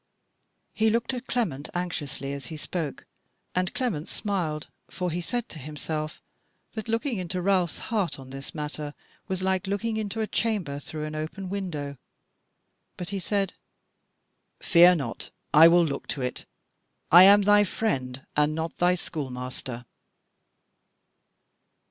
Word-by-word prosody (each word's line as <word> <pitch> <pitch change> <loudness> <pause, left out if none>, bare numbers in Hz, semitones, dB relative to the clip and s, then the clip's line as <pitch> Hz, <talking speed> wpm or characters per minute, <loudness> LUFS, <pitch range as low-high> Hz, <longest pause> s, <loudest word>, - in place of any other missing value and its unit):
He 220 0 +3
looked 230 +3 0
at 250 0 -5
Clement 165 - -1
anxiously 145 -6 -3
as 140 -3 -6
he 160 - -6
spoke; 155 -1 -4 0.5
and 180 0 0
Clement 200 - -1
smiled, 170 -8 -2 0.2
for 180 -2 -2
he 175 +2 -2
said 240 +7 -2
to 155 - -8
himself 155 +2 -4 0.5
that 220 -1 -6
looking 230 0 0
into 180 0 -3
Ralph's 180 -2 +2 0.2
heart 180 -9 +1
on 130 -1 -11
this 135 +3 -7
matter 150 -1 -4 0.3
was 185 -1 -2
like 190 +1 +1
looking 220 +3 -1
into 215 +1 -3
a 220 - +1
chamber 205 -11 -1
through 150 +1 -5
an 155 - -5
open 155 +5 -4
window. 155 -8 -4 1.0
But 180 - -5
he 200 - -2
said: 195 +1 0 1.1
"Fear 175 +1 +7
not 135 -8 -4 0.2
but 150 - +6
I 165 - +11
will 170 0 +6
look 140 -3 -4
to 140 - -3
it; 125 - -3 0.7
I 175 - +11
am 200 +1 +8
thy 205 +1 +6
friend, 135 - -2
and 150 +1 +3
not 160 0 -3
thy 180 +1 +4
schoolmaster." 130 -5 -5
175 Hz, 145 wpm, -27 LUFS, 150-200 Hz, 1.1 s, I